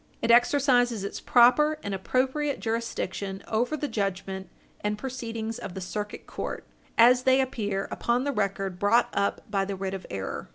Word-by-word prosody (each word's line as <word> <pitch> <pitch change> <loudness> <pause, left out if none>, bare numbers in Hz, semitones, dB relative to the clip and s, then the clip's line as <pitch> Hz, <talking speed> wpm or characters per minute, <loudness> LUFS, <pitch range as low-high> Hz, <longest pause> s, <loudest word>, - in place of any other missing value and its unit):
It 230 - +2
exercises 245 -3 +4
its 200 - -4
proper 300 +6 +5
and 200 - -3
appropriate 260 +8 0
jurisdiction 215 -4 -3
over 245 +7 0
the 295 - -2
judgment 195 -3 -3 0.3
and 210 0 -1
proceedings 230 -3 -5
of 195 -2 -7
the - - -4
Circuit 205 +3 -5
Court, - - -5 0.3
as 245 +2 +7
they 260 +1 +4
appear 210 -7 -1
upon 240 +2 0
the 285 - 0
record 195 -5 -2
brought 230 +4 +3
up 200 0 0
by 195 -1 +1
the 195 0 -3
writ 190 0 -4
of 190 - -6
error. 95 -1 -5
225 Hz, 165 wpm, -27 LUFS, 195-250 Hz, 0.3 s, as